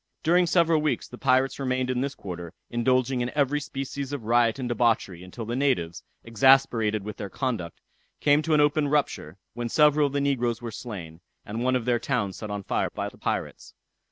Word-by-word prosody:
During 175 Hz, +2 st, +4 dB
several 165 Hz, -2 st, +3 dB
weeks 150 Hz, -6 st, -1 dB
the 125 Hz, -, -11 dB
pirates 130 Hz, +1 st, +2 dB
remained 130 Hz, -1 st, -1 dB
in 125 Hz, 0 st, -1 dB
this 140 Hz, +1 st, -3 dB
quarter, 85 Hz, -3 st, -7 dB, 0.2 s
indulging 125 Hz, +1 st, +1 dB
in 120 Hz, -, -1 dB
every 145 Hz, 0 st, +2 dB
species 140 Hz, -1 st, -5 dB
of 140 Hz, -5 st, -4 dB
riot 115 Hz, +1 st, +3 dB
and 130 Hz, -2 st, -3 dB
debauchery, 115 Hz, -7 st, 0 dB
until 100 Hz, +5 st, -8 dB
the 120 Hz, +2 st, -3 dB
natives, 85 Hz, -, 0 dB, 0.2 s
exasperated 115 Hz, -3 st, +3 dB
with 105 Hz, 0 st, -7 dB
their 100 Hz, -, -5 dB
conduct, 110 Hz, -, -3 dB, 0.4 s
came 145 Hz, +1 st, +4 dB
to 155 Hz, 0 st, +1 dB
an 150 Hz, -, +5 dB
open 145 Hz, 0 st, +2 dB
rupture, 140 Hz, -, -1 dB, 0.2 s
when 120 Hz, +1 st, -4 dB
several 150 Hz, 0 st, +4 dB
of 140 Hz, -, -7 dB
the 145 Hz, -, +1 dB
negroes 125 Hz, -5 st, 0 dB
were 120 Hz, -1 st, -6 dB
slain, 90 Hz, -8 st, -8 dB, 0.2 s
and 110 Hz, +3 st, -4 dB
one 130 Hz, 0 st, +2 dB
of 125 Hz, -3 st, -1 dB
their 120 Hz, -1 st, +2 dB
towns 115 Hz, -9 st, -2 dB
set 110 Hz, -, -7 dB
on 105 Hz, -1 st, -4 dB
fire -, -, -1 dB
by -, -, -3 dB
the -, -, -19 dB
pirates. -, -, -4 dB
125 Hz, 200 wpm, -26 LUFS, 110-140 Hz, 0.4 s, an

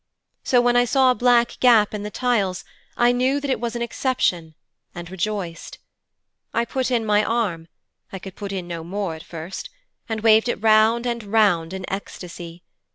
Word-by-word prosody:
So 250 Hz, -2 st, +3 dB
when 245 Hz, 0 st, +2 dB
I 245 Hz, -, +5 dB
saw 260 Hz, +1 st, +4 dB
a -, -, +3 dB
black 240 Hz, 0 st, +2 dB
gap 225 Hz, -5 st, +5 dB
in 210 Hz, -, -4 dB
the 210 Hz, -, -5 dB
tiles, 210 Hz, -6 st, -1 dB, 0.3 s
I 240 Hz, 0 st, +4 dB
knew 255 Hz, +3 st, +1 dB
that 285 Hz, -1 st, -3 dB
it -, -, 0 dB
was 235 Hz, 0 st, -3 dB
an 235 Hz, -, -2 dB
exception, 180 Hz, -, -1 dB, 0.4 s
and 175 Hz, 0 st, -8 dB
rejoiced. 190 Hz, -2 st, -4 dB, 0.8 s
I 235 Hz, -, +1 dB
put 260 Hz, +1 st, -2 dB
in 235 Hz, -3 st, 0 dB
my 210 Hz, 0 st, +3 dB
arm 210 Hz, -8 st, -1 dB, 0.4 s
I 195 Hz, -, -5 dB
could 190 Hz, 0 st, -10 dB
put 200 Hz, -1 st, -6 dB
in 185 Hz, -3 st, -4 dB
no 170 Hz, -2 st, -5 dB
more 190 Hz, 0 st, -3 dB
at 160 Hz, -, -9 dB
first 170 Hz, +2 st, -8 dB, 0.4 s
and 220 Hz, -1 st, -3 dB
waved 220 Hz, +1 st, +4 dB
it -, -, -2 dB
round 220 Hz, +2 st, +4 dB
and 235 Hz, -1 st, -2 dB
round 200 Hz, -6 st, +2 dB
in 190 Hz, -1 st, -5 dB
ecstasy. 175 Hz, -3 st, -7 dB
215 Hz, 185 wpm, -22 LUFS, 180-240 Hz, 0.8 s, I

